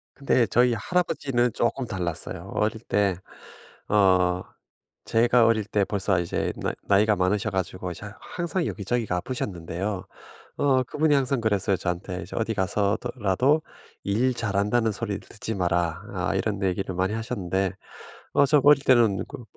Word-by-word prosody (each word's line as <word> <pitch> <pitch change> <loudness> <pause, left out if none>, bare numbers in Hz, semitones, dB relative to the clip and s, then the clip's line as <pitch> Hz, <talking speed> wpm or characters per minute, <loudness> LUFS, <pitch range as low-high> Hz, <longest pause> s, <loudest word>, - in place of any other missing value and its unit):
근데 130 -3 +2
저희 120 +3 +3
할아버지는 135 -6 0
쪼끔 120 +3 0
달랐어요. 90 -7 -4
어릴 110 +1 0
때 100 -5 +1 0.8
어 90 -3 +3 0.6
제가 115 +1 +4
어릴 110 -2 +2
때 105 -1 +1
벌써 100 -2 0
이제 85 -1 -2
나 - - -2
나이가 105 +1 +4
많으셔 95 +4 +1
가지고 95 -1 -3
이제 90 - -8
항상 175 0 -3
여기저기가 105 -1 -2
아프셨는데요. 95 -3 -4 0.5
어 130 -2 +3
그분이 150 +3 +1
항상 135 -2 +1
그랬어요 100 -3 +1
저한테. 90 +2 -3
"이제 90 - -9
어디 115 0 0
가서더 100 +5 0
라도 125 +9 +2 0.4
일 120 +6 +1
잘한다는 110 +1 +1
소리 105 -2 -3
듣지 110 0 -6
마라." 85 -3 0
아 - - -1
이런 105 -2 -1
얘기를 95 0 -1
많이 95 +3 0
하셨는데 95 -5 -2 0.6
어 - - +5
저 145 0 +4
어릴 145 -1 +6
때는 115 -8 +4
그 125 - -9
105 Hz, 320 characters per minute, -25 LUFS, 95-120 Hz, 0.8 s, 어릴